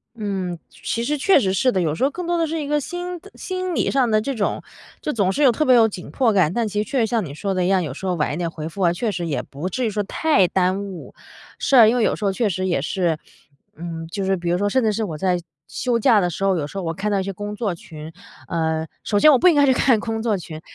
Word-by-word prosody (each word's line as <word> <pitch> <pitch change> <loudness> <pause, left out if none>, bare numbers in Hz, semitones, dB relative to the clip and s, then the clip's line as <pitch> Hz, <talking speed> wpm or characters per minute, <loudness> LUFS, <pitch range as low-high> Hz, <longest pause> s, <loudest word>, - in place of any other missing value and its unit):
嗯， 195 -5 -3
其 230 - -4
实 295 +5 -1
确 375 +4 +4
实 190 -7 0
是 255 +6 +2
的。 185 - 0
有 155 -3 0
时 165 - -3
候 275 - +4
更 355 +5 -6
多 345 0 0
的 330 -1 +1
是 320 +1 -3
一 285 - -4
个 295 +1 +1
心 355 +4 -5
的 405 +4 -16
心 370 -1 -4
理 - - +1
上 260 -3 +2
的 215 0 +3
这 275 +4 -3
种 210 -4 -2 0.4
就 300 - -2
总 195 -4 +1
是 290 +6 0
有 260 - +7
特 240 - 0
别 255 - +6
有 225 -2 +6
紧 185 -4 -8
迫 240 -5 +1
感。 180 -4 +3
但 235 0 0
其 210 0 -1
实 - - -14
确 265 -2 0
实 225 - +3
像 225 -2 0
你 140 - -8
说 195 +5 -3
的 185 -1 0
一 - - +1
样， 190 -2 +2
有 140 -4 -4
时 190 - -8
候 180 - 0
晚 150 -3 -1
一 - - -3
点 170 -1 -2
回 155 -1 -6
复 195 +3 -7
啊， 170 -1 +3
确 215 +4 -2
实 175 -2 -3
也 150 - -1
不 150 +7 -6
至 250 +5 -2
于 - - +1
说 210 0 -1
太 205 - +2
耽 185 +2 0
误。 190 -3 -9 0.5
是 275 - +1
啊， 230 -4 +9
因 235 - +3
为 235 - +2
有 - - +2
时 210 - -8
候 195 - +2
确 215 +1 0
实 185 +1 -2
也 170 -7 0
是 170 0 0 0.6
嗯 165 0 -6
就 195 +3 -4
是 190 0 +1
比 175 0 -3
如 175 - +2
说 205 - 0
甚 260 +2 +1
至 220 - +2
是 220 +2 -2
我 165 -7 -4
在 180 +2 +1 0.3
休 240 -2 -1
假 225 -4 +4
的 180 - +1
时 195 +4 -3
候， 190 -1 +3
有 155 - -1
时 145 - -8
候 195 - -3
我 165 - -2
看 205 +4 -2
到 200 - +1
一 - - -1
些 195 0 -4
工 205 +2 -6
作 205 -4 -2
群， 155 -1 -10 0.4
呃 160 -1 -1 0.2
首 205 -1 +1
先 305 - +7
我 - - +6
不 360 +5 +5
应 325 - +3
该 285 - +5
去 265 - +4
看 245 -3 +3
工 225 0 -3
作 215 -4 +1
群， 160 -3 -9
200 Hz, 330 characters per minute, -21 LUFS, 175-245 Hz, 0.6 s, 啊